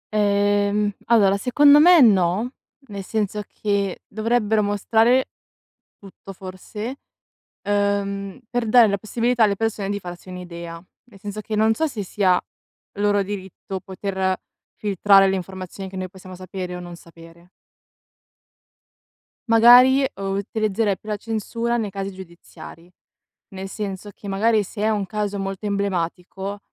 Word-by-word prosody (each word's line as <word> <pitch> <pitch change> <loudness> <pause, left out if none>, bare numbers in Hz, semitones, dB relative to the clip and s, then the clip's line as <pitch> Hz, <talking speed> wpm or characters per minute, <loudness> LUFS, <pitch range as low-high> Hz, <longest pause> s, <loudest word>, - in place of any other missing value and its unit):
Ehm, 205 0 +2
allora 200 -4 +4
secondo 285 +6 +5
me 345 +2 +7
no, 200 0 +3 0.4
nel 200 -1 -6
senso 210 +1 -2
che 200 -2 -2
dovrebbero 220 0 +1
mostrare 225 +5 +2 0.7
tutto 195 0 -12
forse, 195 +6 -7 0.7
uhm, 200 -1 -1
per 240 -1 -1
dare 235 0 +7
la 200 0 0
possibilità 235 +3 +1
alle 200 -2 +1
persone 220 -2 -2
di 200 0 -2
farsi 175 0 -10
un'idea: 170 -2 -8 0.3
nel 230 -5 -18
senso 205 +1 -6
che 215 0 -4
non 220 +1 +4
so 320 +8 0
se 235 -8 -5
sia 185 -1 +2 0.6
loro 205 0 +2
diritto 190 -1 -6
poter 190 0 -2 0.4
filtrare 195 -1 +4
le 195 - 0
informazioni 190 +1 -7
che 190 - -10
noi 185 -1 -4
possiamo 185 -1 -12
sapere 185 -1 -6
o - - -7
non 175 0 -9
sapere. 170 +1 -16 2.0
Magari, 245 +4 +7
uhm, 195 0 -3
utilizzerei 210 0 -1
più 215 - -12
la 210 - -1
censura 230 +2 -3
nei 220 -3 -1
casi 195 0 -5
giudiziari; 170 -2 -13 0.6
nel 190 0 -7
senso 200 -1 -5
che, 205 - -11
magari, 215 +2 +2
se 205 +2 -4
a 220 - +2
un 205 -2 -1
caso 205 0 -3
molto 195 +1 -5
emblematico, 195 0 -3
200 Hz, 135 wpm, -22 LUFS, 190-215 Hz, 2.0 s, me